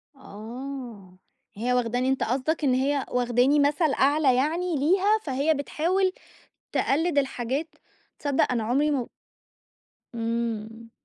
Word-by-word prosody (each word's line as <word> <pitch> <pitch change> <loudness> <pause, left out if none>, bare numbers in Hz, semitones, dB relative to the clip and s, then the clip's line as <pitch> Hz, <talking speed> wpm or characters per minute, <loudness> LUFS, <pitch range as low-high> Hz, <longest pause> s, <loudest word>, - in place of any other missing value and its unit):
آه، 230 -4 -9 0.4
هي 245 +4 -1
واخداني 245 +1 0
أنت 265 - +1
قصدك 275 +6 -1
إن 260 -3 +3
هي 275 +1 +1
واخداني 245 +4 +2
مثل 290 +1 +2
أعلى 280 -2 +3
يعني 330 +6 0
ليها، 380 +9 +3
فهي 280 +3 +1
بتحاول 355 +6 0 0.6
تقلّد 320 +2 +1
الحاجات 270 +3 -1 0.4
تصدّق 285 -3 +1
أنا 230 -3 0
عمري 280 +7 +1
م 255 -5 0 1.1
إمم، 230 -1 -3
270 Hz, 115 wpm, -26 LUFS, 240-300 Hz, 1.1 s, إن